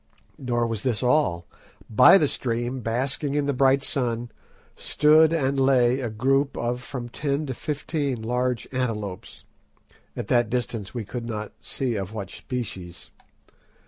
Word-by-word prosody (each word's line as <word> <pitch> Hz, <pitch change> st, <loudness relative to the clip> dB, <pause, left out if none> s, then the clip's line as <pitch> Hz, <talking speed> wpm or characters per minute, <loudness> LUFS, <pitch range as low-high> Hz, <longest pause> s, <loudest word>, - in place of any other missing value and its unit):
Nor 120 Hz, -3 st, 0 dB
was 115 Hz, -3 st, -3 dB
this 125 Hz, -1 st, -1 dB
all. 125 Hz, -, +2 dB, 0.4 s
By 125 Hz, -, +7 dB
the 155 Hz, -, +3 dB
stream, 120 Hz, 0 st, -2 dB
basking 130 Hz, +5 st, -1 dB
in 145 Hz, -1 st, +1 dB
the 140 Hz, -, 0 dB
bright 135 Hz, +1 st, +3 dB
sun, 120 Hz, -4 st, -2 dB, 0.4 s
stood 155 Hz, +1 st, +4 dB
and 140 Hz, -4 st, +1 dB
lay 130 Hz, -1 st, +4 dB
a 125 Hz, -3 st, -2 dB
group 135 Hz, +5 st, +1 dB
of 120 Hz, +1 st, -2 dB
from 125 Hz, -2 st, -6 dB
ten 140 Hz, +4 st, -2 dB
to 130 Hz, -, -3 dB
fifteen 145 Hz, 0 st, -2 dB
large 125 Hz, +1 st, -1 dB
antelopes—at 105 Hz, -5 st, -7 dB
that 120 Hz, -2 st, +2 dB
distance 120 Hz, -3 st, -3 dB
we 115 Hz, -3 st, -3 dB
could 120 Hz, +2 st, -5 dB
not 110 Hz, -2 st, -4 dB
see 125 Hz, -5 st, -2 dB
of 95 Hz, +1 st, -5 dB
what 100 Hz, -4 st, -5 dB
species. 95 Hz, -9 st, -6 dB
125 Hz, 145 wpm, -25 LUFS, 115-135 Hz, 0.4 s, By